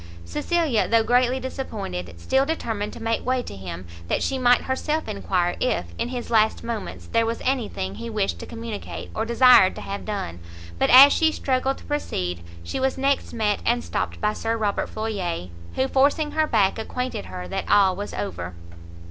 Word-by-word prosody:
Cecilia, 285 Hz, -, 0 dB
though 230 Hz, -1 st, +4 dB
greatly 245 Hz, +2 st, +2 dB
disappointed, 145 Hz, -, -5 dB
still 265 Hz, -, +2 dB
determined 225 Hz, -9 st, -2 dB
to -, -, -9 dB
make 225 Hz, 0 st, 0 dB
way 255 Hz, 0 st, 0 dB
to -, -, -8 dB
him, 90 Hz, -2 st, -7 dB, 0.2 s
that -, -, 0 dB
she 270 Hz, -, -1 dB
might 245 Hz, -1 st, +5 dB
herself 300 Hz, +4 st, -2 dB
enquire 185 Hz, -4 st, 0 dB
if, 85 Hz, -, -1 dB
in -, -, 0 dB
his 245 Hz, -1 st, -5 dB
last 220 Hz, -1 st, +3 dB
moments, 230 Hz, -2 st, -5 dB
there 230 Hz, 0 st, +3 dB
was 230 Hz, +1 st, -2 dB
any 255 Hz, -4 st, 0 dB
thing 95 Hz, +1 st, -4 dB
he 235 Hz, -, -6 dB
wished 210 Hz, -3 st, -1 dB
to -, -, -8 dB
communicate, 230 Hz, -2 st, -7 dB
or 220 Hz, -, -1 dB
desired 235 Hz, -4 st, +6 dB
to -, -, -7 dB
have 200 Hz, +1 st, -5 dB
done; 195 Hz, -, -4 dB, 0.4 s
but, -, -, +3 dB
as 275 Hz, +3 st, +10 dB
she 320 Hz, -1 st, +3 dB
struggled 265 Hz, -2 st, 0 dB
to -, -, -14 dB
proceed, 90 Hz, -, -3 dB, 0.2 s
she 175 Hz, -, -4 dB
was 265 Hz, 0 st, 0 dB
next 275 Hz, +1 st, 0 dB
met 215 Hz, -3 st, 0 dB
and 240 Hz, +1 st, +1 dB
stopt -, -, -3 dB
by 210 Hz, 0 st, +1 dB
Sir 225 Hz, +1 st, -2 dB
Robert 210 Hz, -2 st, -1 dB
Floyer, 190 Hz, -, -3 dB, 0.3 s
who, 260 Hz, -, +1 dB
forcing 285 Hz, +3 st, +2 dB
her 315 Hz, 0 st, +1 dB
back, 195 Hz, -4 st, +2 dB
acquainted 250 Hz, -, -4 dB
her 90 Hz, 0 st, -7 dB
that -, -, -4 dB
all 195 Hz, -2 st, +5 dB
was 205 Hz, +2 st, -5 dB
over! 90 Hz, -3 st, -5 dB
225 Hz, 190 wpm, -24 LUFS, 190-260 Hz, 0.4 s, as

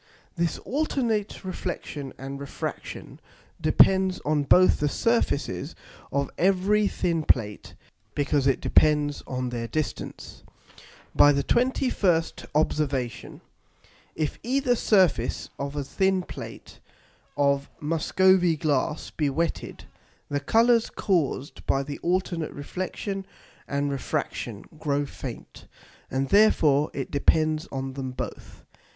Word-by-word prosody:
This 170 Hz, -1 st, 0 dB
alternate 235 Hz, -9 st, -1 dB
Reflexion 155 Hz, -6 st, -5 dB
and 135 Hz, +1 st, -6 dB
Refraction 140 Hz, 0 st, -6 dB, 0.4 s
depends 190 Hz, +4 st, +4 dB
on 150 Hz, 0 st, +2 dB
both 185 Hz, +5 st, +5 dB
the 145 Hz, -, +1 dB
Surfaces 230 Hz, -7 st, 0 dB, 0.4 s
of 140 Hz, 0 st, -1 dB
every 195 Hz, +3 st, +3 dB
thin 170 Hz, -4 st, 0 dB
Plate, 105 Hz, -8 st, 0 dB, 0.4 s
because 145 Hz, -1 st, +1 dB
it 135 Hz, -, +2 dB
depends 150 Hz, -1 st, +3 dB
on 125 Hz, -1 st, -2 dB
their 120 Hz, -1 st, -4 dB
distance. 155 Hz, +3 st, -5 dB, 0.7 s
By 145 Hz, -, +7 dB
the 140 Hz, -1 st, +1 dB
21st 235 Hz, -, +1 dB
Observation, 140 Hz, -5 st, -1 dB, 0.7 s
if 155 Hz, -2 st, -2 dB
either 255 Hz, 0 st, +1 dB
Surface 185 Hz, -, +2 dB
of 140 Hz, +1 st, -4 dB
a 145 Hz, -, -2 dB
thin 190 Hz, +6 st, +1 dB
Plate -, -, -9 dB, 0.6 s
of 140 Hz, -1 st, +2 dB
Muscovy 175 Hz, +3 st, +3 dB
Glass 150 Hz, 0 st, -1 dB
be 150 Hz, -3 st, 0 dB
wetted, 165 Hz, +5 st, -3 dB, 0.5 s
the 145 Hz, -, 0 dB
Colours 230 Hz, +8 st, +3 dB
caused 155 Hz, -7 st, -1 dB
by 135 Hz, -, +2 dB
the 145 Hz, +1 st, -6 dB
alternate 175 Hz, -2 st, -1 dB
Reflexion 185 Hz, +6 st, -4 dB, 0.4 s
and 140 Hz, 0 st, -1 dB
Refraction 120 Hz, -5 st, -3 dB
grow 145 Hz, -2 st, 0 dB
faint, -, -, -9 dB, 0.4 s
and 135 Hz, 0 st, -1 dB
therefore 155 Hz, -9 st, +4 dB
it 135 Hz, -, -4 dB
depends 155 Hz, +2 st, +2 dB
on 135 Hz, 0 st, -4 dB
them 130 Hz, -1 st, -4 dB
both. 125 Hz, -, -7 dB
155 Hz, 110 wpm, -26 LUFS, 140-190 Hz, 0.7 s, By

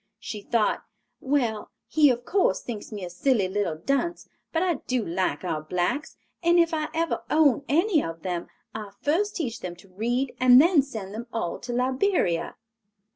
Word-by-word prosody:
She 210 Hz, -2 st, -6 dB
thought, 220 Hz, 0 st, +1 dB, 0.4 s
"Well, 245 Hz, -6 st, 0 dB, 0.2 s
he 300 Hz, -2 st, +5 dB
of 245 Hz, -1 st, -1 dB
course 370 Hz, -, +2 dB
thinks 225 Hz, -3 st, -7 dB
me 205 Hz, -4 st, -5 dB
a -, -, -6 dB
silly 210 Hz, +1 st, +2 dB
little 190 Hz, -4 st, -1 dB
dunce; 275 Hz, -, -1 dB, 0.2 s
but 330 Hz, +2 st, +1 dB
I 360 Hz, -2 st, +2 dB
do 250 Hz, -3 st, 0 dB
like 180 Hz, +3 st, -1 dB
our 160 Hz, -4 st, -2 dB
blacks, 180 Hz, -, -2 dB, 0.2 s
and 345 Hz, 0 st, +4 dB
if 335 Hz, -1 st, +4 dB
I 310 Hz, -1 st, -1 dB
ever 330 Hz, 0 st, -1 dB
own 285 Hz, -4 st, +4 dB
any 335 Hz, +2 st, +3 dB
of 165 Hz, 0 st, -6 dB
them, 175 Hz, -2 st, -3 dB, 0.3 s
I'll 210 Hz, -2 st, -7 dB
first 385 Hz, +8 st, +1 dB
teach 240 Hz, -, -3 dB
them 175 Hz, -1 st, -6 dB
to 180 Hz, +2 st, -18 dB
read 240 Hz, +7 st, -1 dB
and 255 Hz, 0 st, +8 dB
then 330 Hz, 0 st, +6 dB
send 220 Hz, -8 st, -7 dB
them 235 Hz, +3 st, -6 dB
all 225 Hz, -7 st, -3 dB
to 245 Hz, -, -6 dB
Liberia." 255 Hz, -, +1 dB
245 Hz, 180 wpm, -26 LUFS, 195-305 Hz, 0.4 s, and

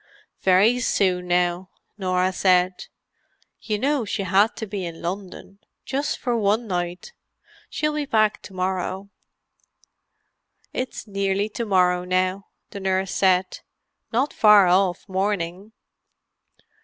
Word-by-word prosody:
"Very 200 Hz, +6 st, +4 dB
soon 180 Hz, -6 st, 0 dB
now," 180 Hz, +1 st, 0 dB, 0.3 s
Norah 185 Hz, -2 st, 0 dB
said. 185 Hz, -1 st, +2 dB, 0.7 s
"You 210 Hz, -2 st, -2 dB
know 275 Hz, +3 st, 0 dB
she 205 Hz, -1 st, -3 dB
had 195 Hz, +4 st, +3 dB
to 220 Hz, -, -5 dB
be 200 Hz, -2 st, -5 dB
in 170 Hz, -2 st, -6 dB
London—just 195 Hz, +9 st, -5 dB
for 245 Hz, -2 st, -1 dB
one 215 Hz, +1 st, +1 dB
night. 180 Hz, -, -4 dB, 0.6 s
She'll 300 Hz, 0 st, -1 dB
be 300 Hz, -1 st, -3 dB
back 215 Hz, -3 st, +2 dB
to 195 Hz, -, -12 dB
morrow." 185 Hz, +1 st, -3 dB, 1.6 s
"It's 255 Hz, -1 st, -4 dB
nearly 200 Hz, 0 st, -1 dB
to 235 Hz, +2 st, -4 dB
morrow, 180 Hz, -2 st, +2 dB
now," 185 Hz, +2 st, -1 dB, 0.2 s
the 200 Hz, -, -7 dB
nurse 190 Hz, -1 st, -1 dB
said. 185 Hz, -1 st, +1 dB, 0.5 s
"Not 255 Hz, +5 st, 0 dB
far 210 Hz, -2 st, +6 dB
off 180 Hz, +1 st, +2 dB
morning." 190 Hz, 0 st, -2 dB
195 Hz, 120 wpm, -23 LUFS, 185-210 Hz, 1.6 s, far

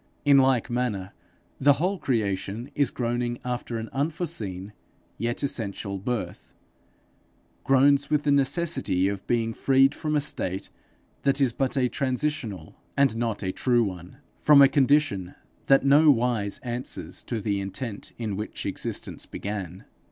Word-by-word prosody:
In 140 Hz, -1 st, +7 dB
like 130 Hz, -3 st, +3 dB
manner 110 Hz, -6 st, -2 dB, 0.5 s
the 145 Hz, +1 st, +6 dB
whole 180 Hz, +7 st, -1 dB
creation 110 Hz, -1 st, -2 dB
is 140 Hz, -4 st, +1 dB
groaning 120 Hz, 0 st, -2 dB
after 125 Hz, -1 st, -3 dB
an 110 Hz, 0 st, -5 dB
unforeseen 135 Hz, -, -3 dB, 0.5 s
yet 120 Hz, +4 st, -2 dB
essential 100 Hz, -6 st, -3 dB
birth 120 Hz, +3 st, -5 dB, 1.1 s
groans 140 Hz, +1 st, +4 dB
with 150 Hz, -1 st, +1 dB
the 145 Hz, -, +2 dB
necessity 140 Hz, -, +1 dB
of 100 Hz, -1 st, -4 dB
being 115 Hz, -1 st, 0 dB
freed 135 Hz, +3 st, +3 dB
from 155 Hz, 0 st, -2 dB
a -, -, +4 dB
state 95 Hz, -10 st, -3 dB, 0.5 s
that 140 Hz, 0 st, +2 dB
is 130 Hz, -4 st, +2 dB
but 135 Hz, +2 st, -1 dB
a 125 Hz, -1 st, +3 dB
transitional 125 Hz, -, -3 dB, 0.2 s
and 140 Hz, -5 st, +3 dB
not 115 Hz, -3 st, -2 dB
a 95 Hz, -, -1 dB
true 120 Hz, +3 st, +2 dB
one, 90 Hz, +2 st, -6 dB, 0.2 s
from 150 Hz, -2 st, +5 dB
a 140 Hz, -, +9 dB
condition 135 Hz, -10 st, +2 dB, 0.3 s
that 135 Hz, 0 st, +5 dB
nowise 125 Hz, -8 st, +4 dB
answers 120 Hz, 0 st, -3 dB
to 115 Hz, -, -3 dB
the 100 Hz, -1 st, -1 dB
intent 100 Hz, +2 st, -6 dB
in 110 Hz, -4 st, -3 dB
which 105 Hz, +2 st, -5 dB
existence -, -, -4 dB
began. 95 Hz, -3 st, -6 dB
125 Hz, 140 wpm, -26 LUFS, 105-140 Hz, 1.1 s, a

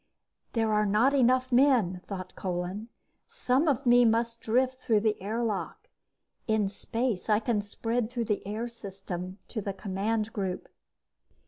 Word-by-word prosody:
There 225 Hz, -2 st, +1 dB
are 210 Hz, 0 st, +2 dB
not 220 Hz, +7 st, +3 dB
enough 255 Hz, -1 st, +3 dB
men, 240 Hz, -9 st, +3 dB
thought 185 Hz, -2 st, -6 dB
Kolin. 185 Hz, +4 st, -3 dB, 0.4 s
_Some 270 Hz, +6 st, +1 dB
of 275 Hz, 0 st, 0 dB
me 245 Hz, 0 st, +6 dB
must 230 Hz, 0 st, +1 dB
drift 255 Hz, +3 st, +1 dB
through 220 Hz, -4 st, +3 dB
the 215 Hz, -2 st, 0 dB
airlock. 215 Hz, +1 st, -3 dB, 0.6 s
In 215 Hz, -3 st, +2 dB
space, 225 Hz, +1 st, -3 dB
I 210 Hz, -, +5 dB
can 220 Hz, -1 st, 0 dB
spread 225 Hz, +3 st, -2 dB
through 240 Hz, -2 st, -2 dB
the 210 Hz, -2 st, -1 dB
air 220 Hz, +3 st, -3 dB
system 195 Hz, -5 st, -7 dB
to 220 Hz, -, -3 dB
the 200 Hz, 0 st, -3 dB
command 210 Hz, +3 st, -2 dB
group. 190 Hz, -3 st, -3 dB
220 Hz, 145 wpm, -28 LUFS, 200-240 Hz, 0.6 s, me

